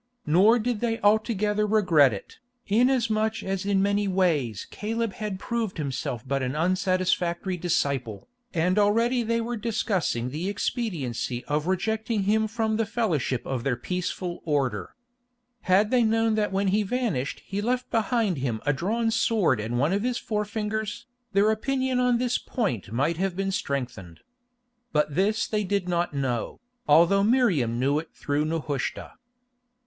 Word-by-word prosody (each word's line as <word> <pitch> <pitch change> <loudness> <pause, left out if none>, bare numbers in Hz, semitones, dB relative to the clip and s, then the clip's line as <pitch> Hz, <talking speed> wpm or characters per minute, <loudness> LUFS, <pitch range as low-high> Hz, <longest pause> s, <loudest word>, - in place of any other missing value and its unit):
Nor 190 +10 +5
did 240 -1 -1
they 230 0 -1
altogether 210 -1 +2
regret 175 - +4
it, 100 - -8 0.3
inasmuch 225 -1 +1
as 195 0 -3
in 195 -1 +2
many 200 0 +1
ways 160 - 0
Caleb 225 0 -2
had 210 -3 -4
proved 225 -1 -3
himself 135 -3 -4
but 135 +1 0
an 130 +2 -2
unsatisfactory 185 +1 0
disciple, 140 - -1 0.2
and 180 +4 +1
already 230 +4 +3
they 230 0 0
were 240 +1 -3
discussing 190 - -1
the 165 +7 -3
expediency 145 - -3
of 150 +2 -1
rejecting 220 +3 0
him 220 +2 +2
from 220 -1 -1
the 225 - +1
fellowship 175 - -1
of 130 -3 -3
their 135 -2 +1
peaceful 180 +5 -4
order. 130 - -1 0.7
Had 200 +3 +4
they 250 -1 +4
known 225 0 +2
that 215 -2 0
when 195 0 +1
he 205 +3 +2
vanished 205 - -2
he 200 +1 -3
left 250 +3 -1
behind 225 - +1
him 120 -4 -2
a 145 - +3
drawn 225 +9 0
sword 220 - +2
and 115 +3 -2
one 145 +8 +2
of 200 - +1
his 245 +1 -1
forefingers, 210 0 -3 0.3
their 200 +2 +4
opinion 260 +3 0
on 250 -1 +3
this 245 0 0
point 155 - -3
might 145 +8 0
have 190 0 -1
been 195 +1 -1
strengthened. 125 - -4 0.7
But 150 -1 +1
this 205 +7 +1
they 210 -1 -1
did 200 -1 -1
not 175 0 0
know, 130 -5 -2 0.3
although 170 +6 +5
Miriam 190 - +2
knew 140 +3 +2
it 160 - -8
through 145 +1 -1
Nehushta. 155 -4 -3
195 Hz, 155 wpm, -26 LUFS, 150-220 Hz, 0.7 s, Nor